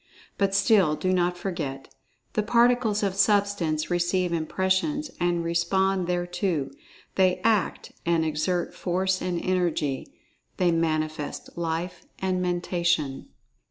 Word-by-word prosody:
But 195 Hz, -1 st, +2 dB
still, 195 Hz, -6 st, +4 dB
do 185 Hz, +4 st, 0 dB
not 180 Hz, 0 st, +1 dB
forget—the 170 Hz, +2 st, -5 dB
Particles 235 Hz, -1 st, +3 dB
of 195 Hz, -2 st, +1 dB
Substance 200 Hz, -6 st, +1 dB
receive 175 Hz, 0 st, +1 dB
impressions 190 Hz, -, 0 dB
and 175 Hz, -1 st, +1 dB
respond 185 Hz, +2 st, +1 dB
thereto—they 175 Hz, +1 st, -1 dB
act 215 Hz, -5 st, +1 dB
and 165 Hz, -1 st, +2 dB
exert 165 Hz, +3 st, -1 dB
Force 185 Hz, +1 st, -1 dB
and 180 Hz, -2 st, -1 dB
Energy—they 175 Hz, 0 st, -2 dB
manifest 155 Hz, -2 st, -2 dB
Life 170 Hz, +1 st, -3 dB
and 185 Hz, -1 st, -1 dB
Mentation. 175 Hz, -5 st, 0 dB
180 Hz, 100 wpm, -26 LUFS, 165-190 Hz, -, still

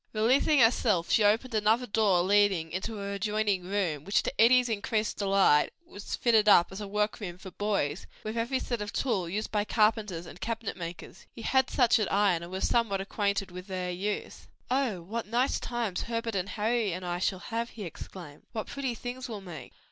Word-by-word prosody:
Releasing 255 Hz, +7 st, +3 dB
herself, 220 Hz, -6 st, +3 dB
she 220 Hz, -, +4 dB
opened 225 Hz, +5 st, +2 dB
another 220 Hz, +3 st, +2 dB
door 200 Hz, -5 st, +2 dB
leading 195 Hz, -4 st, +3 dB
into 195 Hz, +5 st, -4 dB
an 200 Hz, 0 st, -4 dB
adjoining 205 Hz, -2 st, 0 dB
room 180 Hz, -7 st, -1 dB
which, 200 Hz, +4 st, +1 dB
to -, -, -1 dB
Eddie's 250 Hz, +2 st, +6 dB
increased 215 Hz, 0 st, -1 dB
delight, 195 Hz, -7 st, +3 dB
was 205 Hz, -11 st, -6 dB
fitted 220 Hz, -3 st, +3 dB
up 175 Hz, -3 st, +6 dB
as 190 Hz, +2 st, -7 dB
a 205 Hz, -, -5 dB
work 210 Hz, +1 st, -1 dB
room 180 Hz, -5 st, -6 dB
for 190 Hz, 0 st, -10 dB
boys, 190 Hz, -6 st, -1 dB, 0.2 s
with 215 Hz, +1 st, -4 dB
every 235 Hz, +3 st, 0 dB
sort 240 Hz, -3 st, -3 dB
of 205 Hz, 0 st, -4 dB
tool 195 Hz, -10 st, -1 dB
used 210 Hz, +4 st, -3 dB
by 210 Hz, -1 st, +1 dB
carpenters 210 Hz, -5 st, +1 dB
and 180 Hz, -, -12 dB
cabinet 225 Hz, -2 st, -3 dB
makers. 170 Hz, -1 st, -8 dB
He 230 Hz, -, -9 dB
had 265 Hz, +1 st, +2 dB
such 245 Hz, -3 st, +3 dB
at 215 Hz, -, -1 dB
Ion 195 Hz, -4 st, +3 dB
and 170 Hz, +1 st, -8 dB
was 190 Hz, +1 st, -1 dB
somewhat 225 Hz, -5 st, +1 dB
acquainted 200 Hz, -1 st, -1 dB
with 180 Hz, +2 st, -9 dB
their 185 Hz, -2 st, -3 dB
use. 200 Hz, +4 st, -4 dB, 0.2 s
"Oh 250 Hz, -10 st, 0 dB
what 220 Hz, +6 st, -4 dB
nice 245 Hz, +4 st, +1 dB
times 235 Hz, -6 st, -2 dB
Herbert 230 Hz, -1 st, -3 dB
and 195 Hz, 0 st, -2 dB
Harry 220 Hz, -2 st, 0 dB
and 180 Hz, +1 st, -5 dB
I 175 Hz, 0 st, -2 dB
shall 185 Hz, +1 st, 0 dB, 0.2 s
have!" 230 Hz, +1 st, -1 dB
he 215 Hz, -, -8 dB
exclaimed. 170 Hz, -3 st, -9 dB
"What 220 Hz, -2 st, -3 dB
pretty 265 Hz, -4 st, -3 dB
things 250 Hz, +2 st, -6 dB
we'll 215 Hz, -3 st, -6 dB
make! 165 Hz, -9 st, -9 dB
205 Hz, 200 wpm, -29 LUFS, 185-230 Hz, 0.2 s, Eddie's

